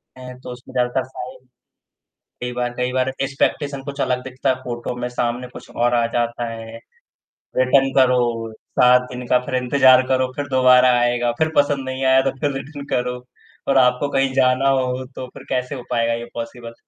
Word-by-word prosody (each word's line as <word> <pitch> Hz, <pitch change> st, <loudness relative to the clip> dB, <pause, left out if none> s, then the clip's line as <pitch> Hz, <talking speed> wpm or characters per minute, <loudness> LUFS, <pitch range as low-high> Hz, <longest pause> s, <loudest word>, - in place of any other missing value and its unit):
करते 130 Hz, 0 st, -10 dB
हैं 125 Hz, 0 st, -10 dB
तो 125 Hz, -, -8 dB
उसमें 125 Hz, 0 st, -12 dB
ज़्यादातर 125 Hz, +1 st, 0 dB
साइज़ 130 Hz, 0 st, -9 dB, 1.0 s
कई 125 Hz, 0 st, -3 dB
बार 120 Hz, 0 st, -2 dB
कई 125 Hz, 0 st, -1 dB
बार 130 Hz, 0 st, +1 dB
एक्सपेक्टेशन 140 Hz, +1 st, -1 dB
कुछ 140 Hz, 0 st, -5 dB
अलग 125 Hz, 0 st, 0 dB
दिखता 130 Hz, +1 st, -3 dB
है 130 Hz, -, +3 dB
फोटो 120 Hz, 0 st, -4 dB
में 125 Hz, -, -1 dB
सामने 125 Hz, 0 st, -2 dB
कुछ -, -, -11 dB
और 120 Hz, +1 st, +2 dB
आ 120 Hz, -1 st, +2 dB
जाता 120 Hz, 0 st, -1 dB
है, 115 Hz, 0 st, -8 dB, 0.8 s
रिटर्न 135 Hz, +1 st, +3 dB
करो, 120 Hz, -3 st, +2 dB, 0.3 s
7 125 Hz, 0 st, +6 dB
दिन 125 Hz, 0 st, -6 dB
का 125 Hz, -, +4 dB
फ़िर 130 Hz, -, -1 dB
इंतज़ार 130 Hz, 0 st, +5 dB
करो, 130 Hz, -1 st, +1 dB
फ़िर 145 Hz, 0 st, -3 dB
दोबारा 130 Hz, -1 st, +5 dB
आएगा 120 Hz, 0 st, +1 dB
फ़िर 160 Hz, 0 st, +1 dB
पसंद 145 Hz, -2 st, +2 dB
नहीं 130 Hz, +1 st, -3 dB
आया 130 Hz, 0 st, +5 dB
तो -, -, -11 dB
फ़िर 145 Hz, -2 st, 0 dB
रिटर्न 140 Hz, +1 st, -8 dB
करो। 125 Hz, 0 st, -2 dB, 0.4 s
और 135 Hz, -, +3 dB
आपको 125 Hz, +2 st, +3 dB
कहीं 135 Hz, -1 st, +1 dB
जाना 130 Hz, +1 st, +3 dB
हो 125 Hz, 0 st, -2 dB
तो 130 Hz, -, -5 dB
फ़िर -, -, -13 dB
कैसे 125 Hz, +1 st, -2 dB
हो 125 Hz, -, -7 dB
पायेगा 115 Hz, -1 st, +1 dB
ये 115 Hz, 0 st, -5 dB
पॉसिबल? 115 Hz, 0 st, -7 dB
125 Hz, 190 wpm, -21 LUFS, 120-130 Hz, 1.0 s, 7